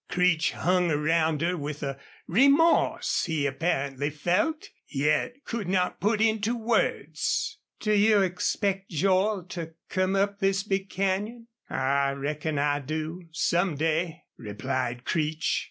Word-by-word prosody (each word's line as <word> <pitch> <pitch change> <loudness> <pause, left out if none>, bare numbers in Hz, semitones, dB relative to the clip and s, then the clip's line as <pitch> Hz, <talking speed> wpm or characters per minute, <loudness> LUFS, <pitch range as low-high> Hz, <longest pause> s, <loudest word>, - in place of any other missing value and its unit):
Creech 180 -2 +2
hung 180 0 +1
around 160 0 +1
her 175 +1 +1
with 150 -2 -5
a 140 -1 -4 0.3
remorse 280 - +3
he 160 -4 -1
apparently 140 -1 -1
felt, 180 - 0 0.2
yet 150 - 0
could 225 -5 -4
not 180 -1 0
put 210 +2 +2
into 220 +1 +1
words. 225 0 0 0.2
"Do 215 - 0
you 210 -1 +5
expect 190 +1 -1
Joel 190 +4 +1
to 165 -3 -6
come 185 0 +1
up 200 +1 0
this 195 -1 +1
big 195 -2 -2
canyon?" 205 +5 -2 0.2
"I 140 +1 +1
reckon 150 +2 -3
I 145 0 +1
do 155 +5 -5
some 170 +1 +1
day," 160 +2 -1
replied 120 +3 -3
Creech. 155 0 0
175 Hz, 130 wpm, -27 LUFS, 150-200 Hz, 0.3 s, you